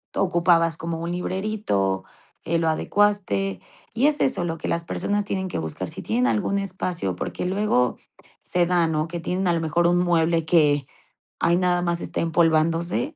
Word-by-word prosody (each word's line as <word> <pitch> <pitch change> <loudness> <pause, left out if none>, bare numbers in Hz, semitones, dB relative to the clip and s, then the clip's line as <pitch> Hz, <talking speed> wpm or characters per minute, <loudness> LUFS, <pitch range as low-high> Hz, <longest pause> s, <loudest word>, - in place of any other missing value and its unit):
ocupabas 170 -3 +3
como 165 0 -4
un 170 +1 -4
librerito, 180 - -1 0.4
eh, 165 0 0
lo 165 - 0
adecuaste. 160 - 0 0.3
Y 250 +6 +3
es 300 -1 +2
eso 195 -9 +2
lo 165 -1 -3
que - - -5
las 170 0 -1
personas 205 +4 -1
tienen 190 -2 -2
que 175 - -3
buscar, 80 -1 -4
si - - -7
tienen 120 +4 0
algún 120 - 0
espacio 180 - -3
porque 90 - -4
luego, 185 - +1 0.5
se 175 -1 +1
da, 175 -2 +2
¿no?, 155 0 -1
que 170 +1 -5
tienen 185 +2 -1
a 175 - +3
lo 165 - 0
mejor 170 +2 +1
un 175 0 +3
mueble 165 -2 +2
que 145 -4 +3 0.5
ahí 170 - +3
nada 180 -1 +1
más 170 -1 -1
está - - -4
empolvándose. 165 - +1
170 Hz, 180 wpm, -23 LUFS, 160-185 Hz, 0.5 s, ocupabas